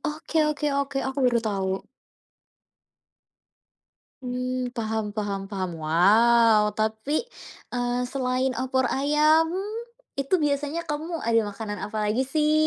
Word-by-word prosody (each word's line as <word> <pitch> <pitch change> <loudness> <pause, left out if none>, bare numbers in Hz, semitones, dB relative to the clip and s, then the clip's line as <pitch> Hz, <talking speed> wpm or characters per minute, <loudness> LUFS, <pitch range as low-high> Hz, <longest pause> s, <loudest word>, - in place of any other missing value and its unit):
Oke 310 +1 -4
oke 300 0 -1
oke, 280 0 -4
aku 265 +1 -3
baru 240 -1 +4
tahu. 195 -2 -1 2.4
Mmm, 250 0 -2
paham 220 -2 -2
paham 200 -2 -4
paham. 190 -3 -3
Wow! 210 +6 +5
Tapi, 220 - -1 0.5
eee, 245 0 0
selain 255 0 -1
opor 260 +1 0
ayam, 300 +3 +3 0.6
itu 275 +6 -1
biasanya 295 +3 -1
kamu 315 +3 -3
ada 230 0 +4
makanan 205 0 -6
apalagi 215 +3 0
sih? 300 +3 +1
250 Hz, 110 wpm, -25 LUFS, 215-280 Hz, 2.4 s, Wow